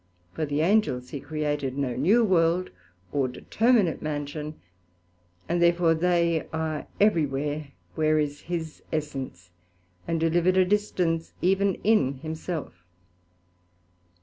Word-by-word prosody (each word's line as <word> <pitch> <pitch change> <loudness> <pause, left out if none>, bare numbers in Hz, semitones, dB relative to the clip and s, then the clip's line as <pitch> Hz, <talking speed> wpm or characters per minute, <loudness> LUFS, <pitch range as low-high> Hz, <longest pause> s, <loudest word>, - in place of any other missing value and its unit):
For 155 - -2
the 145 +1 0
Angels 170 -9 +2
he 140 - -5
created 145 -2 -2
no 130 -4 -1
new 200 - +4
World, 180 -2 +2 0.4
or 140 -2 +1
determinate 215 - +1
mansion, 150 0 -4 0.9
and 175 +1 0
therefore 170 -1 +4
they 170 -1 +1
are 160 -1 -3
everywhere 150 -6 +1 0.3
where 155 -1 +2
is 145 -1 -1
his 165 -3 -4
Essence, 135 - -4 0.6
and 165 -1 0
do 165 - +2
live 170 +2 +1
at 185 0 +4
a 185 - +5
distance 180 -5 0
even 195 +1 +3
in 200 -11 +3
himself. 155 - -6
160 Hz, 120 wpm, -26 LUFS, 145-175 Hz, 0.9 s, a